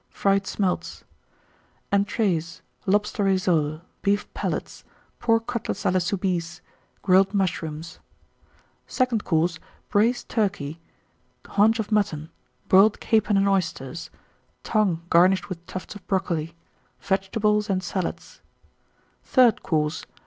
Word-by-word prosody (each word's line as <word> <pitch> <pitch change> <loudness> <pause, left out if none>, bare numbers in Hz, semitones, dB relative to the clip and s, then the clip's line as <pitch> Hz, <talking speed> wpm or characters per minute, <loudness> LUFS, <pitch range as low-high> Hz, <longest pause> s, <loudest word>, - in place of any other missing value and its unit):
Fried 195 -1 +1
Smelts. 190 -3 -2 0.9
ENTREES. 200 -5 0 0.2
Lobster 205 +1 +1
Rissoles. 170 -5 +1 0.2
Beef 205 0 +1
Palates. - - -4 0.4
Pork 230 -1 +2
Cutlets 235 -2 -3
à - - +2
la 185 - +3
Soubise. 180 -2 -2 0.4
Grilled 190 +1 +4
Mushrooms. 165 -4 -2 0.9
SECOND 250 -4 0
COURSE. 165 0 +1 0.3
Braised 230 +4 +2
Turkey. 185 -8 -1 0.7
Haunch 220 +2 +3
of 220 -1 -4
Mutton. 170 -7 0 0.4
Boiled 200 +3 +5
Capon 215 -2 +2
and 195 0 +3
Oysters. 170 -6 -2 0.5
Tongue, 195 -7 +1
garnished 185 +4 +4
with 170 -2 -6
tufts 185 - -7
of 205 - -11
Brocoli. 170 -4 -1 0.4
Vegetables 210 +2 0
and 185 -1 0
Salads. 185 -3 -4 0.8
THIRD 250 -3 +4
COURSE. 155 -2 -1
190 Hz, 105 wpm, -24 LUFS, 170-210 Hz, 0.9 s, Boiled